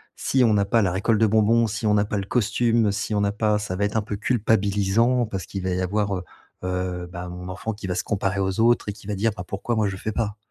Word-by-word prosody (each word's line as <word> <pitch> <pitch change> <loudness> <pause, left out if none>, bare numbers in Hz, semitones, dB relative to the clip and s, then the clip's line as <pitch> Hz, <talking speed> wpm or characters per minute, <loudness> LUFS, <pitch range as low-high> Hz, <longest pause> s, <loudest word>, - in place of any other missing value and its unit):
si 130 -2 +2
on 110 - +4
n'a 100 -1 +3
pas 115 +3 +2
la 90 -3 +1
récolte 105 +3 +1
de 110 - +5
bonbons, 110 +2 +3
si 110 +1 -4
on 105 - +3
n'a 105 0 +3
pas 105 - -2
le 95 - -2
costume, 115 -1 +1
si 110 - -3
on 105 - +1
n'a 100 0 +1
pas 105 -1 +1
ça 105 -3 -4
va 100 - -1
être 105 +2 0
un - - +2
peu 105 0 -5
culpabilisant 110 +2 +2
parce 95 -3 -5
qu'il 95 -2 -6
va 95 - -1
y 90 +1 -1
avoir, 100 +1 0
heu, - - -8 0.4
heu, 90 -1 -3
bah 90 0 -6
mon 90 +1 -7
enfant 110 +4 -4
qui 100 -2 -7
va 90 - -2
se - - -1
comparer 100 -2 -1
aux 95 +2 0
autres 120 -2 +3
et 105 - -2
qui 100 -1 -16
va 105 - -2
dire: 110 +3 +1
«Bah, 90 - -6
pourquoi 100 +5 -3
moi, 110 -2 +2
je 100 - -3
le - - -6
fais 110 - -3
pas?». 105 -2 -2
105 Hz, 290 wpm, -24 LUFS, 95-110 Hz, 0.4 s, de